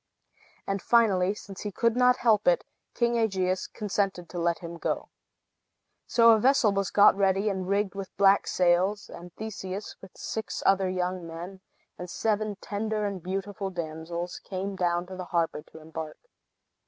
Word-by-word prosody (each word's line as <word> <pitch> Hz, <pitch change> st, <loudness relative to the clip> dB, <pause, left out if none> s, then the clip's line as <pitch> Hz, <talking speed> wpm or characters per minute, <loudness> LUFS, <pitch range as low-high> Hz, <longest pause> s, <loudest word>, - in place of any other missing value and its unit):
And 195 Hz, -1 st, -2 dB
finally, 200 Hz, -5 st, +3 dB
since 195 Hz, -2 st, -10 dB
he 210 Hz, -, -4 dB
could 230 Hz, +3 st, +1 dB
not 250 Hz, 0 st, +5 dB
help 220 Hz, -4 st, +2 dB
it, 175 Hz, -, +4 dB, 0.3 s
King 235 Hz, 0 st, +2 dB
Aegeus 185 Hz, -4 st, 0 dB
consented 195 Hz, -4 st, -2 dB
to 175 Hz, -, -5 dB
let 170 Hz, 0 st, +1 dB
him 170 Hz, -1 st, -8 dB
go. -, -, -2 dB, 1.0 s
So 230 Hz, -1 st, +6 dB
a 220 Hz, -, +5 dB
vessel 255 Hz, -2 st, +4 dB
was 195 Hz, -1 st, 0 dB
got 205 Hz, -1 st, +6 dB
ready, 195 Hz, +1 st, +2 dB
and 190 Hz, -2 st, -3 dB
rigged 200 Hz, 0 st, 0 dB
with 195 Hz, -1 st, -6 dB
black 200 Hz, 0 st, +5 dB
sails; 185 Hz, +3 st, +2 dB
and 175 Hz, +1 st, -10 dB
Theseus, 205 Hz, -2 st, -6 dB
with 190 Hz, -, -14 dB
six 220 Hz, -1 st, -4 dB
other 195 Hz, -1 st, +3 dB
young 180 Hz, -1 st, -2 dB
men, 175 Hz, +4 st, -8 dB, 0.4 s
and 180 Hz, 0 st, -6 dB
seven 215 Hz, +2 st, -1 dB
tender 210 Hz, +1 st, -3 dB
and 200 Hz, -3 st, -3 dB
beautiful 195 Hz, +2 st, -4 dB
damsels, 170 Hz, 0 st, -5 dB
came 195 Hz, +1 st, -4 dB
down 175 Hz, -1 st, 0 dB
to 185 Hz, +1 st, -9 dB
the 185 Hz, -1 st, -6 dB
harbor 170 Hz, -3 st, -1 dB
to 160 Hz, -, -11 dB
embark. 160 Hz, 0 st, -7 dB
195 Hz, 165 wpm, -27 LUFS, 180-210 Hz, 1.0 s, So